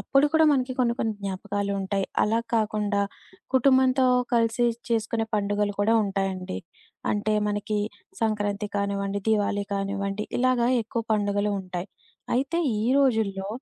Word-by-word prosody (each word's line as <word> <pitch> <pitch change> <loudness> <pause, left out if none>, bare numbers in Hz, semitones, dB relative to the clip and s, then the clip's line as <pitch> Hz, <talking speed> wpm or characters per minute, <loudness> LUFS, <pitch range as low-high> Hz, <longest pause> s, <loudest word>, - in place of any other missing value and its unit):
అప్పుడు 275 +1 +3
కూడా 320 0 +6
మనకి 255 -2 0
కొన్ని 235 -1 +2
కొన్ని 220 -1 0
జ్ఞాపకాలుంటాయి. 200 0 -2 0.2
అలా 225 +2 +2 0.2
కాకుండా 210 -2 +1 0.5
కుటుంబంతో 260 0 +4 0.3
కలిసి 230 +1 +2 0.2
చేసుకునే 225 0 0
పండుగలు 205 0 0
కూడా 225 +3 +3
ఉంటాయండి. 195 -2 -2 0.5
అంటే 210 +1 0
మనకి 205 0 -1 0.4
సంక్రాంతి 210 -1 0
కానివ్వండి, 200 0 -1
దీవాళి 205 -1 +1
కానివ్వండి, 200 +1 -2
ఇలాగ 255 -1 +2 0.2
ఎక్కువ 230 +1 -3
పండుగలు 205 0 0
ఉంటాయి. 185 +1 -5 0.5
అయితే 275 +6 0 0.2
ఈ - - -1 0.2
రోజుల్లో, 220 -8 +1
210 Hz, 120 wpm, -26 LUFS, 200-230 Hz, 0.5 s, కూడా